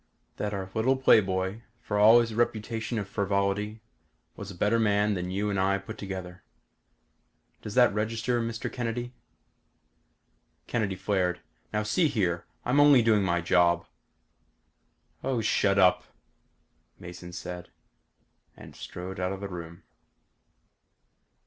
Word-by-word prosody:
"That 105 - -2
our 95 -2 -5
little 125 +4 +2
playboy, 95 -4 +2 0.2
for 105 -3 -2
all 110 +3 +8
his 115 -1 -3
reputation 115 0 -1
of 100 -2 -3
frivolity, 100 +2 -1 0.5
was 100 - -8
a 95 - -9
better 105 +6 +1
man 105 -1 +2
than 90 -1 -3
you 100 +3 -1
and 100 - -1
I 100 +1 +2
put 105 +3 -9
together. 95 -2 -7 1.2
Does 105 - -7
that 125 -4 +5
register, 115 +3 -1
Mr. 115 -1 -4
Kennedy?" 120 0 -3 1.5
Kennedy 105 -5 -1
flared. 95 -2 -1 0.3
"Now 105 0 -1
see 110 +11 +2
here. 95 - -1 0.2
I'm 125 +4 +2
only 145 -4 +7
doing 110 -2 +3
my 85 -2 +1
job!" 85 0 +3 1.4
"Oh 130 -3 0
shut 100 -2 +2
up," 90 -2 +4 0.9
Mason 90 0 -10
said. 90 0 -7 0.9
And - - -13
strode 90 +1 -7
out 90 +1 -1
of 95 - -7
the 100 0 -6
room. 85 -2 -9
100 Hz, 130 wpm, -28 LUFS, 95-115 Hz, 1.5 s, all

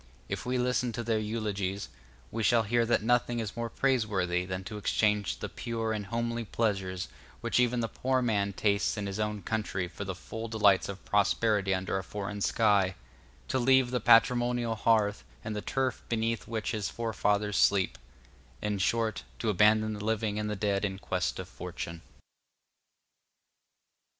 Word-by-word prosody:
If - - -4
we 125 0 +1
listen 125 0 +1
to 120 - -3
their 110 -1 +1
eulogies, 105 -3 -2 0.4
we 115 - -2
shall 115 +1 +4
hear 115 +2 +1
that 115 - +2
nothing 120 +1 +2
is 110 -2 -4
more 115 -1 -3
praiseworthy 105 -10 +1
than 95 0 -4
to 105 +1 -6
exchange 105 -1 +1
the - - -4
pure 115 -2 -3
and 105 -2 -4
homely 115 +2 -2
pleasures 95 -5 -1 0.3
which - - +1
even 125 0 +2
the 115 - 0
poor 130 +3 0
man 100 -4 +1
tastes 100 +2 +1
in 105 - -2
his 100 +1 -4
own 105 -1 -2
country 95 -4 -2
for 90 - -7
the 95 -2 -4
dull 110 +5 -6
delights 105 -4 +3
of 100 0 -7
prosperity 105 -1 +2
under 95 +1 -1
a - - -6
foreign 100 +1 -5
sky; 100 -4 +3 0.5
to 130 - 0
leave 130 0 +4
the 125 - +1
patrimonial 120 +1 +4
hearth 110 -1 +2 0.2
and 110 0 -4
the 105 - -2
turf 130 +2 -1
beneath 115 -3 -1
which 110 -1 -2
his 105 -4 -2
forefathers 105 -3 0
sleep; 100 -3 +3 0.6
in 105 -1 -2
short, 110 +1 +1 0.2
to 110 - 0
abandon 110 +2 +4
the 105 -1 -6
living 110 -1 0
and 105 0 -2
the 105 - -2
dead 100 0 0
in 95 -2 -1
quest 95 - -2
of - - -6
fortune. 85 0 -7
110 Hz, 170 wpm, -30 LUFS, 100-115 Hz, 0.6 s, shall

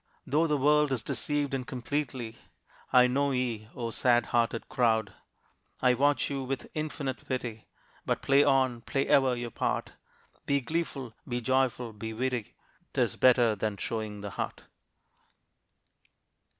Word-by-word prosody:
Though 160 +3 +2
the 150 -1 +1
world 150 +1 +4
is 130 -4 -1
deceived 145 -2 -1
and 130 -2 -2
completely, 125 -3 -3 0.5
I 125 0 +7
know 140 +3 +1
ye, 120 -5 -1
O 115 -2 -3
sad 120 0 +3
hearted 115 -1 +1
crowd! 110 -5 +1 0.7
I 125 -1 +4
watch 145 +3 +2
you 135 -1 -3
with 130 0 -4
infinite 145 -4 -3
pity: 120 -4 -4 0.4
But - - -1
play 140 +1 +5
on, 130 -4 +2
play 135 +3 -1
ever 135 -3 +4
your 120 -1 -5
part, - - -1 0.6
Be 140 0 +3
gleeful, 135 -3 -3
be 120 -1 -1
joyful, 125 -2 0
be 110 +1 -6
witty! 125 -1 -2 0.4
'Tis - - +1
better 120 -3 +5
than 105 0 -2
showing 105 -1 -4
the 105 0 -5
heart. - - -4
125 Hz, 140 wpm, -29 LUFS, 115-140 Hz, 0.7 s, I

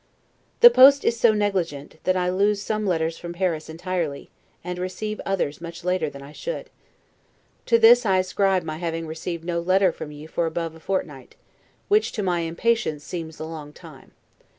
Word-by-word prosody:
The 480 0 +11
post 280 - +7
is 235 - +1
so 235 - +5
negligent, 185 -10 -2
that 185 0 +2
I 180 -1 0
lose 200 +2 +2
some 215 0 -2
letters 165 -2 -1
from 170 0 -7
Paris 170 -4 -2
entirely, 165 -3 -4 0.3
and 180 +1 -5
receive 210 +4 -4
others 175 -6 -2
much 170 0 -8
later 180 -3 0
than 140 -1 -11
I 140 - -11
should. - - -6 1.0
To 230 - +5
this 235 +2 +7
I 190 -4 +2
ascribe 185 0 +1
my 155 -1 -5
having 165 -1 -3
received 165 +1 -6
no 170 -1 -1
letter 185 +2 +3
from 150 - -8
you 150 +1 -10
for 165 +1 -1
above 165 0 -3
a 160 - -14
fortnight, 160 -7 -4 0.5
which 425 +1 +2
to 210 - -3
my 180 -2 0
impatience 170 -1 -1
seems 160 -2 -7
a 155 - -5
long 155 -2 -8
time. - - -15
175 Hz, 180 wpm, -24 LUFS, 160-200 Hz, 1.0 s, The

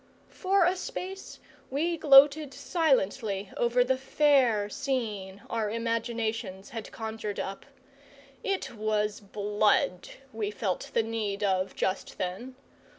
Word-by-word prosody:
For 385 -1 +2
a 360 +2 +2
space 375 +1 -6 0.3
we 325 +6 0
gloated 290 -1 +6
silently 220 - 0
over 240 +1 +3
the 260 +1 0
fair 265 -6 +3
scene 205 -6 -3
our 225 -2 -1
imaginations 225 -3 -2
had 225 -2 -6
conjured 220 -2 -5
up. 195 0 -5 0.8
It 390 -9 -2
was 210 -1 0
BLOOD 205 -3 +1 0.2
we 215 -2 -2
felt 205 -3 -3
the 230 - +4
need 215 -3 -3
of 190 -1 0
just 190 - -2
then. 190 +8 -4
225 Hz, 115 wpm, -28 LUFS, 205-270 Hz, 0.8 s, gloated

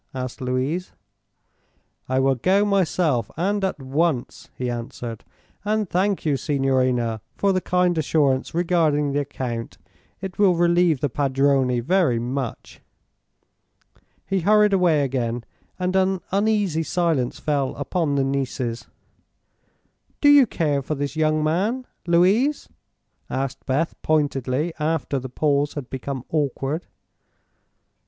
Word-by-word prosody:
asked 130 -1 -5
Louise. 130 +8 -2 1.2
"I 130 0 +2
will 135 0 +3
go 185 - +2
myself, 180 - +1
and 200 +4 0
at 190 -5 -1
once," 135 0 -1
he 125 - -2
answered. 120 -1 -5 0.4
"And 215 0 0
thank 190 +2 0
you, 145 -3 +2
signorina, 130 -5 0
for 200 -1 +2
the 185 - 0
kind 180 -1 +1
assurance 140 -2 +1
regarding 160 -4 +2
the 145 - 0
account. 125 -5 -4 0.4
It 190 0 -7
will 195 -4 +5
relieve 170 -3 +3
the 145 - +1
padrone 135 -2 +2
very 170 -5 +2
much." 125 +1 -4 1.4
He 195 -1 0
hurried 210 +3 +4
away 170 -6 +3
again, 120 -3 -2 0.3
and 185 0 -1
an 190 -1 +2
uneasy 200 -4 +1
silence 165 -7 0
fell 140 -3 -1
upon 145 0 -1
the 135 - +2
nieces. 130 -4 -2 1.3
"Do 290 - +5
you 285 -3 +7
care 150 -7 0
for 150 +3 -3
this 145 +2 -3
young 155 -1 +1
man. 205 +11 0 0.2
Louise?" 195 - +3 0.6
asked 135 0 -4
Beth, 145 +5 0
pointedly, 145 0 0
after 150 -3 -1
the 130 +1 -7
pause 145 +2 0
had 140 -4 -6
become 130 -1 -4
awkward. 145 +1 -2
150 Hz, 125 wpm, -23 LUFS, 130-180 Hz, 1.4 s, you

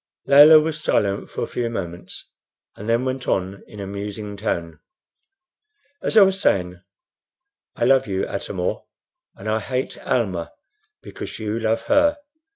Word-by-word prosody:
Layelah 150 +3 +9
was 155 0 -3
silent 100 -7 0
for - - -4
a - - -3
few 120 -1 -3
moments, 85 -6 -7 0.5
and 105 +3 -7
then 115 +2 +2
went 130 -1 -3
on 95 +1 -1
in 105 - -12
a 100 - -4
musing 100 +1 -6
tone: 85 -5 -3 1.2
"As - - 0
I 210 - +10
was 195 0 +1
saying, 90 - 0 0.9
I - - 0
love 135 0 +4
you, 95 -1 -1
Atam 100 -1 -5
or, 90 - -3 0.5
and 100 - -10
I 110 +1 +1
hate 130 +4 -4
Almah 95 -9 -2 0.5
because - - -8
you 110 0 -3
love 110 0 0
her. 290 +1 +3
110 Hz, 155 wpm, -22 LUFS, 95-130 Hz, 1.2 s, I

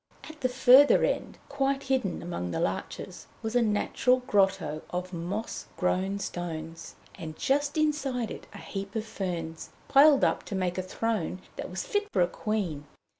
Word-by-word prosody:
At 315 -1 -12
the 255 - +2
further 260 +2 +7
end, - - -1
quite 275 0 0
hidden 260 -8 -1
among 170 - -4
the 85 - -2
larches, - - -4 0.2
was 220 +2 -3
a 245 - +5
natural 235 +4 +2
grotto 190 -8 +1
of 180 +1 -4
moss 180 +6 -4
grown 190 +2 0
stones, 165 -3 -5 0.2
and 160 -4 -8
just 285 +2 +1
inside 285 -6 0
it - - -8
a - - -10
heap 195 +1 -6
of 220 -1 -1
ferns, 175 -7 -4 0.2
piled 285 0 +7
up - - +3
to 205 - -4
make 185 -1 -1
a - - +1
throne 185 -1 -2 0.2
that - - -5
was - - -4
fit 415 -4 0
for 180 - +3
a - - +2
queen. 175 -8 -3
200 Hz, 170 wpm, -28 LUFS, 175-260 Hz, 0.2 s, further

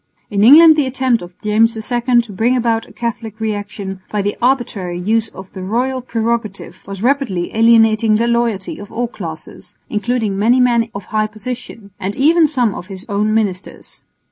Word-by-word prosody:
In 200 0 +1
England 315 +6 +8
the 290 -3 +2
attempt 260 -2 0
of 175 0 -12
James 220 +2 +2
II 240 +2 +1
to 235 -3 -11
bring 235 +6 +1
about 230 -2 0
a - - -16
Catholic 230 -2 -5
reaction 205 -3 -4
by 210 -1 -1
the 205 +1 -1
arbitrary 230 -9 0
use 220 +5 0
of 190 -2 -12
the 190 - -7
royal 250 +7 -1
prerogative 230 -4 -3
was 195 +1 -7
rapidly 245 -11 0
alienating 225 -1 +4
the 230 +2 +1
loyalty 235 -5 -1
of 205 0 -10
all 240 +1 -2
classes, 165 -8 -9 0.2
including 215 -2 -1
many 235 +5 +3
men 235 -2 +2
of 200 - -6
high 215 0 +1
position, 215 -1 -8
and 195 +1 -3
even 315 +4 +4
some 245 -8 0
of 180 - -8
his 190 -2 -10
own 210 +1 0
ministers. 200 -4 -4
225 Hz, 175 wpm, -17 LUFS, 205-240 Hz, 0.2 s, England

